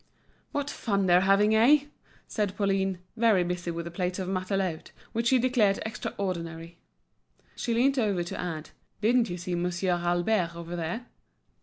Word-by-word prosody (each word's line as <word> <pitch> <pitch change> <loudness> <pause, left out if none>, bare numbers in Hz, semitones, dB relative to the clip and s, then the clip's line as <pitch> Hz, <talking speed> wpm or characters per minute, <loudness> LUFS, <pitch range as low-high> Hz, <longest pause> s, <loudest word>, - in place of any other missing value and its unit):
"What 285 -1 -2
fun 200 -8 -1
they're 180 0 +5
having, 200 +3 +4
eh?" 265 +7 +6 0.4
said 205 -3 -2
Pauline, 195 -2 +1 0.2
very 220 -5 +4
busy 180 0 -3
with 170 0 -4
a 170 - -6
plate 180 +1 -2
of 190 -2 -3
matelote, 185 -3 -2 0.2
which 230 +1 0
she 260 - +5
declared 240 -5 +2
extraordinary. 170 -6 -4 0.8
She 235 - -1
leant 265 +3 +3
over 200 -6 +1
to 170 - -6
add: 160 -3 -4 0.3
"Didn't 235 +2 +3
you 175 - -4
see 180 +1 -4
Monsieur 175 +1 0
Albert 175 +1 +1
over 170 +1 -6
there?" 175 +8 -3
190 Hz, 155 wpm, -28 LUFS, 175-220 Hz, 0.8 s, eh